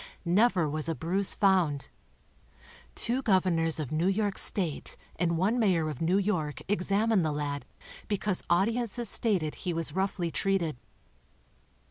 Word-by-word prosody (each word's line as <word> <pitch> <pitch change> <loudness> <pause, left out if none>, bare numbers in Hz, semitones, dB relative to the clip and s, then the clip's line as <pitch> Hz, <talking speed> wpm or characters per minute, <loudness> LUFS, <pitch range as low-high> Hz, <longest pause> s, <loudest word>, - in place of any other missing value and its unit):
Never 185 -1 +3
was 155 +2 -2
a 165 - -1
bruise 185 +5 0
found. 180 -8 +1 1.1
Two 245 +4 0
governors 180 - +2
of 145 -5 -4
New* 160 +4 0
York 200 0 0
state 175 -7 +2 0.2
and 170 -1 0
one 210 +8 +1
mayor 170 -8 +1
of 145 - -9
New 175 +4 +2
York 165 -9 -1
examined 205 +1 +1
the 155 - 0
lad 145 -1 -4 0.4
because 205 -2 0
audiences 230 +6 +2
stated 185 -10 +1
he 180 - -4
was 165 -3 -2
roughly 190 -2 -2
treated. 190 -6 -1
180 Hz, 135 wpm, -28 LUFS, 160-200 Hz, 1.1 s, Never